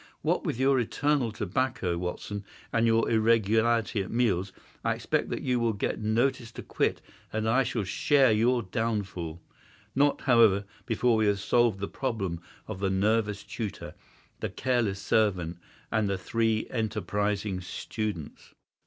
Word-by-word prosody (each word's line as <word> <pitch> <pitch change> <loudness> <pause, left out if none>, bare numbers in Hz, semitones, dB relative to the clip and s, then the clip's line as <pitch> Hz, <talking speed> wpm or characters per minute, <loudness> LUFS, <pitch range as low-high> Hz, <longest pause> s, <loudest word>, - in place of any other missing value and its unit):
What - - +1
with 115 - -2
your 135 0 +4
eternal 135 +1 +1
tobacco, 105 -3 -1
Watson, 90 +4 -4 0.3
and 115 0 +3
your 115 0 +3
irregularity 115 0 +2
at 95 - -5
meals, 100 -6 +1 0.3
I - - +1
expect - - -1
that - - -3
you 125 -1 +1
will 115 -1 +1
get 100 - -2
notice 120 +3 0
to - - -7
quit - - -1 0.3
and 110 0 -2
that 110 - +2
I 135 - +4
shall 120 -3 -2
share 135 +6 +3
your 120 +3 +2
downfall—not, 105 - -3
however, 110 -6 +4 0.2
before 120 0 +2
we 110 -1 +2
have 100 -1 +2
solved 115 0 +2
the 100 - -1
problem 95 -10 -3 0.3
of 110 -4 -6
the 100 -1 0
nervous 105 +1 +1
tutor, 110 -4 -6 0.5
the - - -2
careless 120 -6 0
servant, 90 -6 +1 0.3
and 110 -2 +1
the 100 - 0
three 110 +3 0
enterprising 105 -3 -1
students." 100 -2 -5
110 Hz, 145 wpm, -28 LUFS, 100-115 Hz, 0.5 s, your